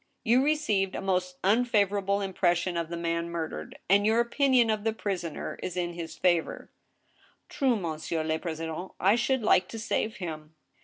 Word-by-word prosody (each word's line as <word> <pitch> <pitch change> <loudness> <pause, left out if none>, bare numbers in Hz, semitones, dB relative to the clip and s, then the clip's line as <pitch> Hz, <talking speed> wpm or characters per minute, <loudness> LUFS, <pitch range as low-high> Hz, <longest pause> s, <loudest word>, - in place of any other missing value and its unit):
You 250 +2 +4
received 245 -11 +1
a - - -2
most 180 -1 -1
unfavorable 200 -2 +2
impression 180 -2 0
of 170 -1 -2
the 170 - -4
man 170 0 -2
murdered, 165 -2 -5
and 200 +2 +4
your 220 +2 +3
opinion 240 -1 +3
of 215 -1 -2
the 225 0 +1
prisoner 185 -7 -4
is 180 0 -4
in 175 -1 -1
his 170 -1 -7
favor." 175 -3 0 0.8
"True, 265 -3 +1
monsieur 160 -3 -3
le 160 0 -1
president, 165 +1 -5
I 195 +4 +4
should 245 +1 0
like 185 -4 +4
to 225 - -7
save 220 0 -1
him." 155 -3 -7
190 Hz, 165 wpm, -28 LUFS, 170-220 Hz, 0.8 s, You